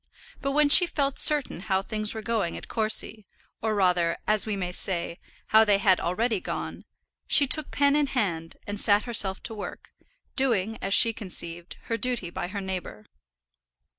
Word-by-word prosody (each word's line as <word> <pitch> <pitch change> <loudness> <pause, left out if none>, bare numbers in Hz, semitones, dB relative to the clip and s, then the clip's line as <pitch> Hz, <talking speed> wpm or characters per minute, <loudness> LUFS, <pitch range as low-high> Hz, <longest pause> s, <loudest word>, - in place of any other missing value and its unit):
But 275 0 -2
when 300 0 +3
she 350 +5 +7
felt 280 -4 -2
certain 295 - +3
how 190 -1 -1
things 215 +1 -3
were 220 - -6
going 220 -7 -2
at - - -10
Courcy, 220 -1 0 0.3
or 220 -1 -1
rather, 180 -4 +1
as 215 0 +1
we 210 - -1
may 180 -2 -4
say, 175 -2 -1 0.3
how 220 0 +6
they 205 -2 +3
had 195 -2 +3
already 215 +5 -1
gone, - - -6 0.4
she 285 - +4
took 295 +2 +1
pen 285 0 +2
in 295 -1 +2
hand, 175 -11 -3
and 205 0 -3
sat 205 0 +3
herself 205 -5 0
to - - -3
work, 210 - -8 0.4
doing, 225 -5 0
as 195 +1 +2
she 230 - +6
conceived, 175 -5 -5
her 230 - -3
duty 230 -7 -2
by 175 - -4
her 200 +2 -6
neighbour. 185 - -6
210 Hz, 175 wpm, -26 LUFS, 185-235 Hz, 0.4 s, she